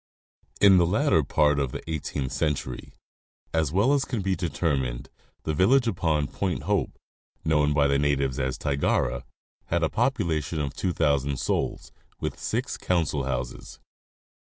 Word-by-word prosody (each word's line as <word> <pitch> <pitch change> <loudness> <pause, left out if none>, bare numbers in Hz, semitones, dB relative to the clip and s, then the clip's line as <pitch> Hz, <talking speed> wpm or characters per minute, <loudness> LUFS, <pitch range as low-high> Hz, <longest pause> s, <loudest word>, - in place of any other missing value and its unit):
In 100 -2 +7
the. 85 - +4
latter 110 - +3
part 75 +1 +2
of 70 -3 -1
the - - -6
eighteenth 70 -4 -3
century, 75 -5 -3 0.6
as 80 -3 +1
well 105 - +3
as 140 -2 +2
can 115 -8 -3
be 95 0 +1
deter 85 -3 0
mined, - - -4 0.3
the 80 - -1
village 120 - +4
upon 80 -8 +1
Point 90 +5 -3
Hope, - - -1 0.5
known 75 -2 +3
by 75 -1 +3
the 70 0 +2
natives 70 -2 0
as 65 -1 -1
Tigara, 65 -3 0 0.4
had 85 0 0
a 80 - +2
population 85 - 0
of 70 -2 -2
2,000 70 -6 0
souls, - - -2 0.3
with - - -4
six - - -2
council 80 -6 0
houses. 60 -2 -5
75 Hz, 150 wpm, -26 LUFS, 70-90 Hz, 0.6 s, In